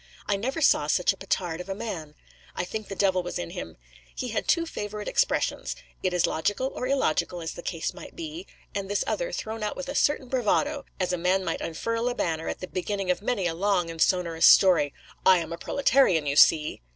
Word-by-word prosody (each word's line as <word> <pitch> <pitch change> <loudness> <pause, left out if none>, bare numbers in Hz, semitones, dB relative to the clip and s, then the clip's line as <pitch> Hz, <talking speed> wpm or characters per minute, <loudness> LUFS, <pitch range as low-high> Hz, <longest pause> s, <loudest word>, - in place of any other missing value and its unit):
I 205 - +1
never 260 +10 -2
saw - - +4
such - - +3
a - - -15
petard 175 -2 -2
of 180 - -10
a 195 - -2
man; 165 -9 -6 0.4
I - - -2
think 215 +3 -5
the 195 - -6
devil 190 -2 +2
was 175 - -5
in 85 - -5
him. - - -7 0.4
He 250 - -3
had 220 - -2
two 335 -1 +3
favourite 210 -8 -5
expressions: - - 0 0.3
'it 185 - 0
is 180 -1 +2
logical,' 205 +11 -1
or 250 - -3
illogical, 185 - 0
as 160 -1 -4
the - - -8
case 165 -2 -3
might - - -11
be: 330 +2 -7 0.3
and 195 -1 -3
this 205 - +1
other, - - -2
thrown 220 - -4
out 210 - -2
with 275 - -6
a - - -3
certain 290 -2 +1
bravado, 265 +4 0
as 185 -1 0
a 180 - -1
man 185 +2 +1
might 165 - -2
unfurl 230 +8 -2
a 245 - -3
banner, 165 -5 -2
at - - -4
the 185 - -5
beginning 190 +1 -2
of 180 - -2
many 210 -3 -1
a 170 - 0
long 180 -1 +1
and 165 -1 -7
sonorous 170 -3 +3
story: 175 -7 +6 0.3
'I 185 - +7
am 165 -1 -4
a - - -5
proletarian, 265 - +3
you 140 0 0
see. 150 - +5
195 Hz, 225 wpm, -26 LUFS, 170-230 Hz, 0.4 s, I